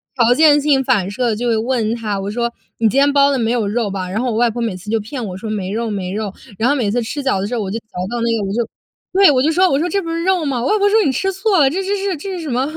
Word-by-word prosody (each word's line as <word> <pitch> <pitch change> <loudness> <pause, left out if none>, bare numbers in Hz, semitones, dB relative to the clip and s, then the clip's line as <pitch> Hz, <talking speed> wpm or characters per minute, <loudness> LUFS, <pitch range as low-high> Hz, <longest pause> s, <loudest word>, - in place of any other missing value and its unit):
条 240 -2 +4
件 295 +1 +5
性 280 -2 +2
反 210 -8 +1
射 245 +4 -1
地 220 - 0
就 240 +3 -2
会 230 - +2
问 225 -1 0
她， 210 -4 -3
我 195 +1 -4
说： 235 +2 -1 0.3
“你 225 -1 +3
今 260 - -1
天 285 +1 +4
包 280 0 +5
的 275 - +1
没 225 -1 0
有 235 -4 0
肉 220 +1 -1
吧？” 190 -2 -4
然 200 +4 -2
后 250 -1 -1
我 220 - -2
外 240 0 +3
婆 235 +2 -5
每 225 -5 -2
次 185 +3 -10
就 225 +1 +1
骗 240 +4 -6
我 185 -3 -6
说： 220 +3 -6
“没 195 -3 -3
肉 225 +2 -2
没 190 -3 -3
肉。” 205 -1 -3 0.2
然 225 - +1
后 285 - +3
每 235 -7 0
次 245 +3 0
吃 285 +5 -4
饺 265 - +1
子 190 - -2
的 - - -2
时 245 - -3
候， 230 - -1
我 195 - -3
就 220 - -2
嚼 220 - -40 0.2
到 240 - -3
那 230 0 +1
个， - - -2
我 - - -3
就 235 0 -1 0.5
对， 390 +1 +6
我 255 -2 +2
就 310 - +2
说， 365 +3 +3
我 275 - +1
说： 335 - 0
“这 395 +3 0
不 335 - -6
是 330 0 -2
肉 370 -2 +1
吗？” 270 -4 -1
我 250 - -1
外 425 - +2
婆 405 0 +3
说： 440 +2 +4
“你 275 - +2
吃 385 +10 -1
错 385 0 +1
了， 275 -3 +5
这 370 +7 -2
这 380 - -5
这 405 - +1
是 355 - -3
这 385 +6 -6
是 350 - -5
什 315 - -5
么？ 255 +1 0
240 Hz, 380 characters per minute, -18 LUFS, 215-295 Hz, 0.5 s, 对